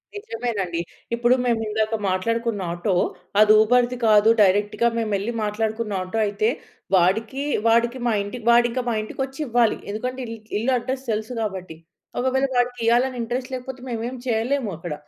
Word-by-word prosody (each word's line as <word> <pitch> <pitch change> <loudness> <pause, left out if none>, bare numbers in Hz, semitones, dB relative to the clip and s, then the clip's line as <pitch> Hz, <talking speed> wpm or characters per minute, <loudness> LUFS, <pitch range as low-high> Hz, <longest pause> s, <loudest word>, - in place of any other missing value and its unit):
నిజమేనండి. 225 - -3 0.3
ఇప్పుడు 240 +2 +3
మేము 235 -2 +2
ఇందాక 215 +1 0
మాట్లాడుకున్న 230 +2 -1
ఆటో, 175 +3 -1 0.5
అది 215 0 +7
ఉబర్‌ది 245 +2 +2
కాదు. 215 0 +6
డైరెక్ట్‌గా 205 +4 +3
మేమెళ్లి 215 -1 -1
మాట్లాడుకున్న 215 +1 -2
ఆటో 185 +4 -3
అయితే, 210 +2 0 0.5
వాడికి, 220 +10 +1 0.2
వాడికి 235 +2 +3
మా 235 - +2
ఇంటి 205 +5 -6
వాడింక 240 +1 +4
మా - - 0
ఇంటికొచ్చి 265 +5 -5
ఇవ్వాలి. 235 -1 +2
ఎందుకంటే 250 +5 -4
ఇల్ 230 0 -6 0.2
ఇల్లు 255 +4 0
అడ్రెస్ 260 +2 -4
తెలుసు 220 +3 -3
కాబట్టి. 185 -6 -5 0.4
ఒకవేళ 260 +2 +1
వాడికి 245 0 +1
ఇయ్యలని 245 +2 +2
ఇంట్రెస్ట్ 250 +3 -3
లేకపోతే 255 0 -6
మేమేం 235 +2 -3
చేయలేము 240 +1 0
అక్కడ. 175 -2 -5
230 Hz, 145 wpm, -23 LUFS, 210-245 Hz, 0.5 s, అది